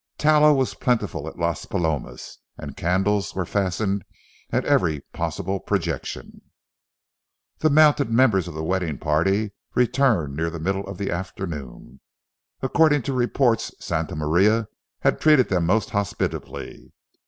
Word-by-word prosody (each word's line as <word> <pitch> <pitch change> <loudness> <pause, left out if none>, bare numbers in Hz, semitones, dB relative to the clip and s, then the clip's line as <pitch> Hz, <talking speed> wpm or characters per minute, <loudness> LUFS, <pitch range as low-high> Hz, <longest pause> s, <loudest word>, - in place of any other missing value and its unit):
Tallow 150 0 +5
was 135 -2 0
plentiful 105 - -1
at - - -8
Las 85 -2 -2
Palomas, 75 -7 -3 0.2
and - - -8
candles 95 +4 0
were 95 -1 -1
fastened 100 +1 -1 0.5
at - - 0
every 75 -4 +2
possible 85 +4 -3
projection. - - -4 1.2
The 155 - +3
mounted 150 -3 +5
members 115 -6 +3
of 85 - -8
the 80 - -4
wedding 90 -4 -1
party 95 - +1 0.2
returned 120 - +2
near 80 +2 -1
the 85 - -6
middle 95 +4 -2
of 100 -2 -7
the 100 - -3
afternoon. 85 -8 -6 0.6
According 150 0 +3
to 135 - -2
reports, 120 -1 +1
Santa - - -3
Maria 95 +9 +2 0.3
had - - +1
treated 150 -5 +5
them 90 -3 +1
most 110 +5 +1
hospitably. 100 -2 -4
95 Hz, 130 wpm, -23 LUFS, 85-120 Hz, 1.2 s, Tallow